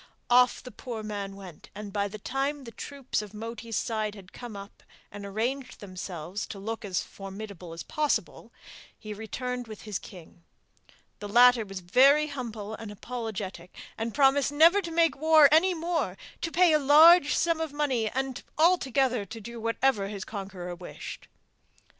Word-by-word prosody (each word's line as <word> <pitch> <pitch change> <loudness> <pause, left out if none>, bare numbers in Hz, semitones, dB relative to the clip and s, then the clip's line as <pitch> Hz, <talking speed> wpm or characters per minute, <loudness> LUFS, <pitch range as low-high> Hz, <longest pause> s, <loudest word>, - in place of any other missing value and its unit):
Off 250 0 +5
the 250 - -9
poor 230 0 -7
man 200 -2 -5
went, 185 -5 -12
and 205 -1 -7
by 205 -1 0
the 210 +2 -8
time 275 +6 -2
the 230 - -9
troops 275 -2 -4
of 210 0 -10
Moti's 225 0 -5
side 215 -2 -2
had 195 -2 -14
come 240 -4 -8
up 200 +1 -11 0.3
and 205 0 -8
arranged 250 +6 -3
themselves 185 -1 -6
to 205 - -8
look 225 +4 -5
as 190 -3 -1
formidable 195 -3 -9
as 165 0 -7
possible, 305 -2 -2 0.5
he 215 -1 -7
returned 245 +3 -5
with 215 -2 -10
his 210 -3 -4
king. 175 -2 -14 0.8
The 205 - -6
latter 245 +1 +6
was 195 -1 -7
very 275 +11 +5
humble 230 -7 -6
and 220 -1 -7
apologetic, 205 -5 -6 0.2
and 225 +1 -3
promised 275 +2 +3
never 330 +7 +6
to 340 - -6
make 330 0 +2
war 310 0 +6
any 350 +4 +4
more, 335 +1 -2 0.2
to 330 - -2
pay 350 -1 +5
a 305 - +5
large 300 +3 +7
sum 335 -1 +1
of 320 -2 -3
money, 265 -7 0
and 265 +1 -3 0.2
altogether 270 - +3
do 225 +3 -9
whatever 230 -2 +1
his 200 -1 -6
conqueror 190 -4 -6
wished. 175 0 -9
230 Hz, 165 wpm, -28 LUFS, 200-280 Hz, 0.8 s, large